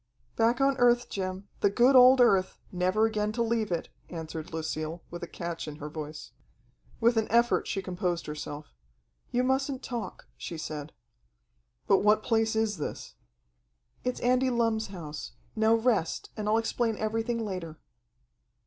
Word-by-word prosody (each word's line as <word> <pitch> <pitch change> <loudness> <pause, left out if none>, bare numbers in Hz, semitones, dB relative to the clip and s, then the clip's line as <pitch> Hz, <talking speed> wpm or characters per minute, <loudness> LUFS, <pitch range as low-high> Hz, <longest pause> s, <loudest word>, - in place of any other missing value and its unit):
"Back 230 +1 +2
on 275 0 +3
earth, 245 0 +4
Jim, 190 0 -4
the 205 - +3
good 245 +6 +4
old 255 +1 +8
earth, 195 -6 +3
never 185 +4 +2
again 210 -1 0
to 235 +1 +1
leave 225 -3 0
it," 170 - -2 0.2
answered 160 -2 -6
Lucille, 160 +1 -4
with 175 +1 -7
a 175 - -5
catch 170 -1 -5
in 150 - -6
her 150 0 -7
voice. 155 -1 -7 0.7
With 235 0 +3
an 220 - +2
effort 235 +1 +3
she 195 - -2
composed 180 -2 -2
herself. 150 0 -7 0.6
"You 250 - +1
mustn't 265 +1 0
talk," 235 -7 -5
she 170 - -6
said. 155 -1 -5 0.9
"But 195 - +4
what 210 +1 +3
place 225 -1 +1
is 220 -2 +1
this?" 150 - -5 0.9
"It's 250 0 -2
Andy 255 +1 +3
Lumm's 230 -2 +1
house. 160 -6 -7 0.2
Now 220 +1 +4
rest, 225 -7 0
and 210 -1 -2
I'll 220 - +4
explain 225 -1 0
everything 225 +2 -1
later." 175 -6 -5
215 Hz, 155 wpm, -29 LUFS, 170-235 Hz, 0.9 s, old